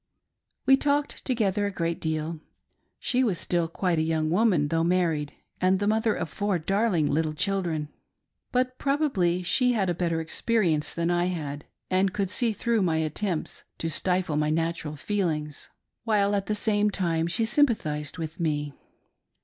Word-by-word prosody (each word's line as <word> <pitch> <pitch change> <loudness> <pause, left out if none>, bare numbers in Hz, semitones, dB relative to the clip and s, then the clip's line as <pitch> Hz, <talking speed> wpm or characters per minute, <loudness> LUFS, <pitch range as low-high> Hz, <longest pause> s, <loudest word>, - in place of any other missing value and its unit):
We 270 - +6
talked 290 +1 0
together 205 -5 +1
a - - -3
great 170 -3 -2
deal. 160 0 -2 0.6
She 255 +1 +1
was 205 -8 +1
still 170 -1 0
quite 170 0 0
a - - +2
young 160 -1 0
woman, 180 -7 +3
though 165 +1 +1
married, 165 -4 +1 0.3
and 185 +1 +4
the 205 - -1
mother 220 +1 +2
of - - -3
four 200 +4 -1
darling 195 -1 +1
little 155 +1 0
children; 170 -5 -1 0.6
but 255 0 0
probably 260 - +1
she 250 +7 +3
had 195 -6 +1
a - - 0
better 170 -1 -1
experience 165 -1 0
than 170 +1 -1
I 175 0 +2
had 150 -5 -4 0.3
and 190 0 +2
could 200 -2 -1
see 235 0 +2
through 225 +1 0
my 165 -4 +1
attempts 160 +2 -2 0.2
to 165 - -2
stifle 180 -3 0
my 150 0 +1
natural 165 -1 -1
feelings, 155 -4 -2 0.3
while 205 -3 +2
at 200 -1 -1
the 215 - 0
same 210 0 +2
time 170 -5 0
she 225 +6 +1
sympathised 185 - +1
with 160 0 -6
me. 150 -3 -1
180 Hz, 165 wpm, -26 LUFS, 160-210 Hz, 0.6 s, We